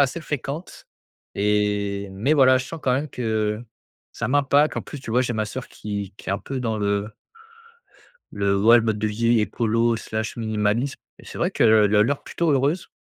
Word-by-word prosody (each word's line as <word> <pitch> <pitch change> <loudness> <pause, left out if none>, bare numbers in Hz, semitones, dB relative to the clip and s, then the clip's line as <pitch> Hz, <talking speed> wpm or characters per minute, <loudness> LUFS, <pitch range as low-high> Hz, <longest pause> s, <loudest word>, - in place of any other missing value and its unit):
assez 140 +5 +1
fréquente, 150 +3 -6 0.5
et 100 -1 0
mais 115 +10 0
voilà 130 -2 +5
je 130 - -4
sens 165 -2 -8
quand 130 - +2
même 145 +3 -2
que 110 -2 -2 0.5
ça - - -3
m'impacte. 145 +2 +3
En - - -2
plus 145 - -9
tu 115 - -8
vois? 125 +2 +3
J'ai 120 -1 -2
ma 110 -1 -1
sœur 130 +3 -7
qui 100 -2 -6
qui - - -11
est - - +1
un 100 - -1
peu 135 -1 -5
dans 110 -3 -1
le 100 +1 -1 1.2
le 100 -1 +1
ouais 115 +3 +7
le - - +1
mode 110 -2 -1
de 110 - 0
vie 115 +2 +2
écolo 115 +2 +1
slash 110 -1 -4
minimaliste, 110 +3 0 0.2
et - - -16
c'est - - -9
vrai - - +1
qu'elle 110 - +4 0.2
a 105 - +6
l'air 140 +5 -1
plutôt 170 -2 -1
heureuse. 145 +5 +1
115 Hz, 200 wpm, -23 LUFS, 105-135 Hz, 1.2 s, ouais